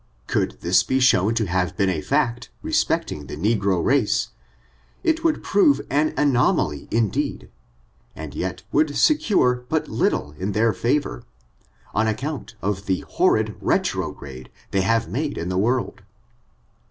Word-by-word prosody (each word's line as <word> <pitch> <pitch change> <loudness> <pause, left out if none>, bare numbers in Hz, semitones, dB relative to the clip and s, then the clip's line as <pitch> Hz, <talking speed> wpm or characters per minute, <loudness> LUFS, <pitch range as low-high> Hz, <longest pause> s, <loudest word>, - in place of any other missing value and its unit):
Could - - -1
this - - +4
be 130 - 0
shown 115 -4 +3
to 115 -2 +1
have 90 0 -1
been 100 -2 +2
a 80 - -2
&ct, 125 - 0
respecting 75 -2 -1
the - - -7
negro 100 -2 +1
race, 135 -6 +2 0.7
it 325 0 +1
would 325 -2 +1
prove 150 -9 +4
an 150 +3 +2
anoma 135 - +2
ly 70 -1 -9
indeed, 110 -3 -1 0.6
and - - -7
yet - - -4
would 150 -2 +1
secure 130 - +3
but - - -1
little 75 - 0
in 100 +2 -2
their 110 +1 +2
fa 125 +5 +2
vor, 60 - -8 0.7
on 110 +1 +1
account 115 0 -4
of 100 -1 -2
the 95 -1 0
horrid - - +2
retrograde 65 -2 -2 0.2
they 100 - +2
have 115 +2 +1
made 140 - -3
in 85 - -3
the 90 - -1
world. 120 +1 0
115 Hz, 150 wpm, -23 LUFS, 95-140 Hz, 0.7 s, this